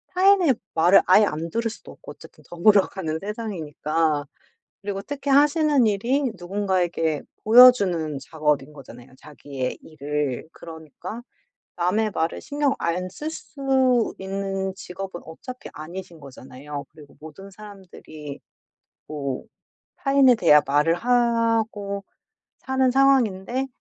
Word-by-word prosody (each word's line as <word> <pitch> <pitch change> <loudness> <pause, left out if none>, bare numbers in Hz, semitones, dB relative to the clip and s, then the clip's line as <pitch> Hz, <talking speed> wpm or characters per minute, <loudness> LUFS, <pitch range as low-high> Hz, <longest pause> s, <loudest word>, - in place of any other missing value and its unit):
타인의 370 -6 +4 0.2
말을 175 +4 +6
아예 205 +3 +6
안 165 -3 -4
들을 230 +6 -1
수도 220 - -12
없고 - - -12
어쨌든 - - -16
더불어 195 +3 +4
가는 160 -5 -4
세상이니까. 165 -7 -2 0.6
그리고 195 -1 -4
특히 280 +5 -4
하시는 290 -2 +4
일이 230 +7 0 0.2
누군가에게 175 -4 -1 0.2
보여 250 +4 +10
주는 170 - -2
작업인 150 -1 -2
거잖아요 125 -4 -14
자기의 140 -3 -6
일을. 150 -2 -4
그러니까 165 - -10 0.5
남의 195 +5 0
말을 165 -3 -2
신경 285 -1 0
안 180 +2 -2
쓸 295 +12 -6
수 265 -6 0
있는 195 0 -3
직업은 190 -1 -8
어차피 250 +10 -10
아니신 170 +2 -9
거잖아요. 140 +1 -9
그리고 150 -2 -17
모든 160 +6 -12
사람들이 185 -8 -11 0.7
뭐 140 -4 -4 0.5
타인에 275 -2 +4
대한 150 -8 +5
말을 145 +4 +3
하고 230 -3 0 0.5
사는 265 0 0
상황인데 260 -2 +2
190 Hz, 280 characters per minute, -23 LUFS, 155-240 Hz, 0.7 s, 보여